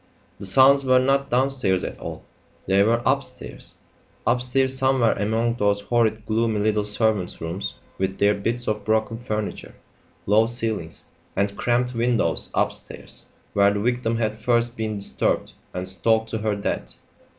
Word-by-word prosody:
The 100 - -5
sounds 135 +7 +6
were 130 -1 +4
not 135 +2 +2
downstairs 125 -7 +1
at - - -5
all; - - -7 0.4
they 95 +1 +3
were 115 +3 +2
upstairs 130 -2 -2 0.5
upstairs, 125 +2 +2
somewhere 130 -3 +3
among 115 +3 0
those 100 -2 +1
horrid 110 0 +1
gloomy 110 -1 +1
little 105 0 +1
servants' 105 -3 0
rooms 85 +4 -4 0.2
with 95 0 -1
their 100 0 +4
bits 115 +4 -3
of 105 -1 -1
broken 110 +1 0
furniture, 110 -3 -4 0.5
low 110 +3 +4
ceilings, 110 -8 -2 0.3
and 100 +1 0
cramped 125 +3 0
windows 115 -7 0
upstairs - - -3 0.3
where 100 0 +4
the 100 - -1
victim 115 +1 0
had 110 -1 -1
first 120 +1 +1
been 110 -2 -3
disturbed 100 - -1 0.2
and 90 +1 -4
stalked 110 +4 +1
to 110 - -2
her 105 -1 0
death. 100 - -3
110 Hz, 150 wpm, -23 LUFS, 100-120 Hz, 0.5 s, sounds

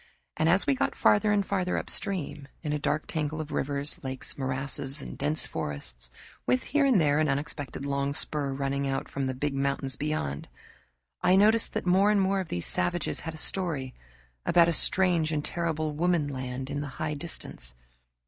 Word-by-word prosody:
And 160 - +2
as 185 +4 +4
we 140 - +3
got 130 - 0
farther 110 - +4
and 205 -1 +2
farther 185 -2 0
upstream, 155 -7 -2 0.2
in 150 -2 -1
a 150 - 0
dark 150 +1 0
tangle 155 -1 -2
of 155 -1 -5
rivers, 140 +2 -1
lakes, 130 -1 -1
morasses, 135 +1 -1
and - - -7
dense 150 +1 0
forests, 60 -4 -4 0.4
with 125 +1 +2
here 290 +1 +2
and 255 -8 +5
there 145 -2 +3
an 155 -1 +2
unexpected 140 0 -2
long 140 0 0
spur 145 -1 0
running 140 0 -1
out 135 0 -2
from 135 -1 -2
the 130 - -2
big 145 +2 -1
mountains 135 -1 -1
beyond, 140 - -2 0.7
I 180 +1 +5
noticed 215 +3 +5
that - - -2
more 190 +3 +4
and 210 -1 +4
more 195 0 +2
of 185 - -3
these 85 - -3
savages 175 -1 0
had 165 -1 -6
a - - -8
story 155 -8 0 0.5
about 170 -1 +5
a 170 - +2
strange 175 -3 +2
and 150 -1 -1
terrible 155 -3 -1
Woman 170 -1 +1
Land 130 0 -4
in 145 0 -2
the 145 - -4
high 155 -1 -1
distance. 140 - -6
150 Hz, 185 wpm, -28 LUFS, 135-170 Hz, 0.7 s, and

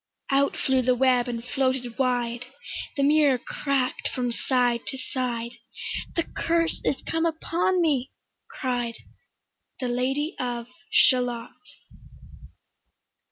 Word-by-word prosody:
Out 275 +1 +3
flew 265 -1 +2
the 255 0 +3
web 250 -1 +3
and 235 -1 -4
floated 255 -2 -1
wide; 245 -2 0 0.5
The 280 - +2
mirror 290 -2 +5
crack'd 265 +1 -1
from 245 -1 -1
side 245 -1 +1
to 265 - -3
side; 245 -3 -2 0.6
"The 335 - +2
curse 330 0 0
is 275 - 0
come 325 0 0
upon 340 +3 +1
me," 280 -5 +2 0.4
cried 245 - -2 0.8
The 255 -2 -1
Lady 270 +7 0
of 240 -2 -2 0.2
Shalott. 245 -2 +3
255 Hz, 115 wpm, -26 LUFS, 245-280 Hz, 0.8 s, mirror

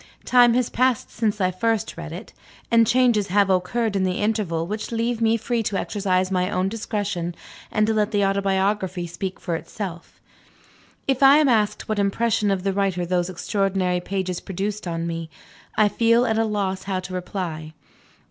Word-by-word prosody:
Time 245 -2 +5
has 250 -1 +2
passed 255 -2 0
since 215 -2 -1
I 185 -1 +2
first 225 +2 -1
read 165 -1 -7
it, 180 +7 -9 0.4
and 230 -1 +5
changes 240 -5 +3
have 200 +1 +3
occurred 200 +4 0
in 195 - +1
the 185 -1 -1
interval, 205 -7 0
which 210 +6 -5
leave 230 0 -1
me 225 0 +3
free 235 +1 -1
to 200 -2 -1
exercise 190 -2 0
my 180 0 +1
own 185 0 0
discretion, 200 -5 -3 0.4
and 215 - +2
to 220 - +1
let 210 -1 +1
the 205 -2 +1
autobiography 195 -2 0
speak 185 +3 -5
for 170 -3 -2
itself. 175 0 -7 0.9
If 270 -1 +1
I 275 +1 +8
am 305 -1 +4
asked 210 -4 +1
what 215 -1 -1
impression 210 +1 +1
of 195 -2 0
the 195 -1 0
writer 190 -3 0
those 175 0 0
extraordinary 185 -1 0
pages 185 -1 -3
produced 195 +2 -4
on 165 -1 -2
me, 165 -1 -4 0.5
I 215 - +5
feel 230 +3 +3
at 220 -2 +1
a 225 - +2
loss 195 -3 -2
how 190 -1 -1
to 185 0 -8
reply. 170 -4 -5
200 Hz, 180 wpm, -23 LUFS, 185-220 Hz, 0.9 s, I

